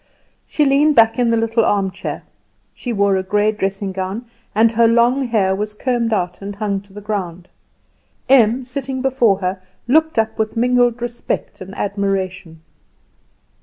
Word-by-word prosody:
She 300 - +1
leaned 285 +2 +3
back 225 +1 +4
in 240 -1 +2
the 230 - +2
little 225 0 +1
armchair; 195 -3 -2 0.5
she 245 - -5
wore 200 -3 +2
a - - 0
grey 205 +3 +1
dressing 195 -1 -3
gown, 190 +5 -4 0.3
and 225 +1 +4
her 230 0 +4
long 240 +3 +3
hair 195 -5 +1
was 210 +1 -4
combed 240 -1 -1
out 180 -4 -2
and 200 0 -6
hung 200 -1 -2
to 200 0 -23
the 210 - -9
ground. 185 -4 -4 0.8
Em, 250 -1 +4
sitting 260 0 -4
before 245 -7 +2
her, 185 0 -2 0.3
looked 315 +3 +2
up 220 0 0
with 220 +1 -2
mingled 245 0 +2
respect 240 -4 -4
and 190 +1 -9
admiration. 190 -4 -3
220 Hz, 160 wpm, -18 LUFS, 195-240 Hz, 0.8 s, back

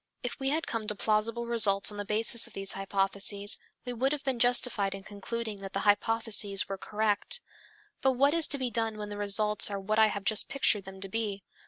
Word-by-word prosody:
If 245 - -5
we 270 0 -1
had 315 +3 -1
come 225 -2 -5
to 210 - -2
plausible 220 +3 -1
results 210 -5 +4
on 205 - -10
the 205 - -4
basis 225 +3 +4
of - - -15
these 195 0 -2
hypotheses, 200 +1 +1 0.3
we 245 - -4
would 265 +4 0
have 295 -1 -5
been 265 -3 -2
justified 240 -5 +1
in 195 - -11
concluding 215 +2 -6
that 195 -1 -9
the - - -2
hypotheses 210 -1 +1
were 195 -1 -6
correct. 210 - -1 0.6
But 265 0 +2
what 280 +3 +2
is 335 -2 +4
to 285 - +2
be 255 -3 -2
done 225 -1 -2
when 210 -1 -6
the 205 - -7
results 210 +1 +2
are 200 -1 -4
what 215 +3 -1
I 220 - +6
have 205 -1 -5
just 215 +1 +1
pictured 225 -7 0
them 190 0 -11
to 195 - -5
be? 200 -1 -4
215 Hz, 220 wpm, -28 LUFS, 200-235 Hz, 0.6 s, I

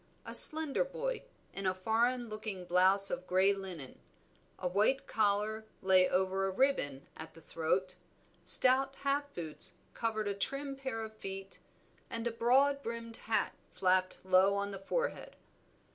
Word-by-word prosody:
A - - -7
slender 315 - +8
boy, - - -5 0.3
in 195 -1 -3
a 185 - 0
foreign 235 +5 0
looking 215 -4 -6
blouse 190 +3 +3
of 180 - -5
grey 190 +2 +3
linen; 185 -9 -8 0.6
a 180 - -3
white 210 +9 +1
collar 215 +1 -1 0.2
lay 185 -1 +4
over 190 +1 0
a - - -1
ribbon 185 - 0
at - - -10
the - - -13
throat, 175 +4 -2 0.5
stout 260 +8 +3
half 285 +1 -1
boots 170 +1 -4 0.2
covered 220 -2 -2
a 200 - -1
trim 275 +7 -4
pair 265 -4 -5
of 220 0 -9
feet, 195 -1 -8 0.5
and 230 0 -4
a 235 - -1
broad 265 +5 +2
brimmed 230 -2 -7
hat 225 0 -1 0.2
flapped 185 0 0
low 190 +1 +4
on 200 0 -3
the 195 - -7
forehead. - - -3
205 Hz, 150 wpm, -32 LUFS, 185-255 Hz, 0.6 s, slender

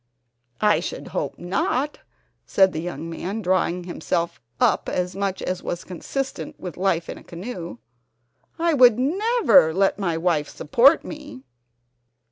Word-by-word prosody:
"I 210 -1 +4
should - - -6
hope - - -3
not," 245 +10 -1 0.4
said 190 -1 +3
the 155 - -3
young 170 -1 -5
man, 190 +6 -4
drawing 180 -1 +1
himself 170 -2 -2 0.2
up - - +2
as 180 0 -2
much 195 -1 -2
as 185 0 -2
was 175 - -4
consistent 265 +9 -5
with 180 -3 -6
life 175 -3 0
in - - -7
a - - -16
canoe. 175 - -7 0.8
"I 335 0 +2
would 250 -5 +6
never 340 - +4
let 195 +1 +2
my 170 -5 0
wife 165 -3 0
support 265 - +4
me." 295 - -9
190 Hz, 140 wpm, -23 LUFS, 170-250 Hz, 0.8 s, would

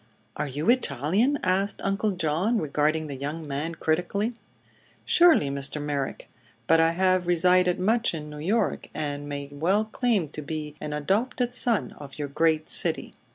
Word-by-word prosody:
"Are 150 - -2
you 145 +4 -4
Italian?" 210 - +1
asked 195 +2 0
Uncle 195 +2 0
John, 180 +7 0
regarding 155 -1 0
the 145 -2 -6
young 150 +4 -5
man 145 +4 -3
critically. 180 +9 -1 0.7
"Surely, 330 - +5
Mr. 140 +2 -2
Merrick. 145 -2 -3 0.4
But 165 +6 +4
I 165 0 +4
have 185 0 +2
resided 180 +1 +3
much 220 +1 +1
in 150 -1 -6
New 150 0 -9
York, 205 +9 -1
and 145 -1 -4
may 140 -1 -5
well 180 +9 +1
claim 215 -5 0
to 155 - -7
be 150 0 -5
an 150 - -4
adopted 225 - -1
son 240 -3 0
of 140 -2 -10
your 145 -1 -4
great 155 +1 +1
city." - - +1
165 Hz, 155 wpm, -26 LUFS, 150-195 Hz, 0.7 s, Surely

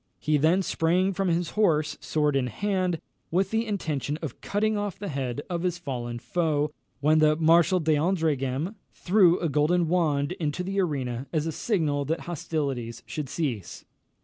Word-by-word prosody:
He 150 0 +1
then 165 +6 +3
sprang 180 +4 +1
from 195 +1 -1
his 170 -1 0
horse, 155 -7 +2
sword 150 -2 +1
in 130 -2 +1
hand, 185 - -1 0.3
with 190 +3 +1
the 225 +1 0
intention 155 - -2
of 145 -6 -6
cutting 215 +1 0
off 205 -3 -3
the 205 - -5
head 135 -1 -3
of 175 -2 -2
his 180 -1 -1
fallen 120 -7 -4
foe, 150 +1 0 0.3
when 155 +2 +4
the 155 0 +5
Marshal 165 +3 +4
d'Andreghem 155 -1 0 0.2
threw 180 -2 +4
a 170 - 0
golden 160 +4 +2
wand 155 -4 +1
into 155 +2 -1
the 195 +2 -2
arena 135 -6 -2
as 155 -2 0
a 165 - -1
signal 155 -7 0
that 160 +4 -1
hostilities 140 -8 -3
should 150 -4 -5
cease. 125 - -3
160 Hz, 165 wpm, -26 LUFS, 145-180 Hz, 0.3 s, the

